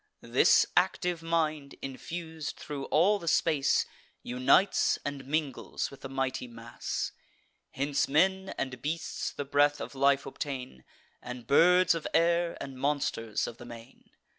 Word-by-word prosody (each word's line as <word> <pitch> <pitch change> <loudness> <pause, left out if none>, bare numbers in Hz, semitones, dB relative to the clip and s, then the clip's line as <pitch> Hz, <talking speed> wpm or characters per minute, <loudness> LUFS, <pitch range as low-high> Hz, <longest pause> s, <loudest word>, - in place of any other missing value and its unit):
This - - +5
active 175 -2 +1
mind, 155 -4 -1
infus'd 160 +3 -6
thro' 140 -2 -6
all 195 +7 +3
the 170 - -9
space, 155 -4 +2 0.4
Unites 125 +10 +3
and 140 -2 -5
mingles 145 -3 -2
with 140 0 -13
the 135 - -7
mighty 135 -1 -2
mass. 115 0 -5 0.6
Hence 140 +1 0
men 190 +6 +2
and 130 -2 -4
beasts 160 +4 -3
the 145 - -5
breath 145 +1 +3
of - - -6
life 140 0 +2
obtain, 130 - -6 0.4
And 125 -1 -8
birds 180 +7 +5
of 165 -2 -4
air, 170 0 +2
and 135 -2 -7
monsters 140 -6 -1
of 115 - -7
the 120 - -11
main. 115 -1 -13
145 Hz, 140 wpm, -29 LUFS, 130-165 Hz, 0.6 s, This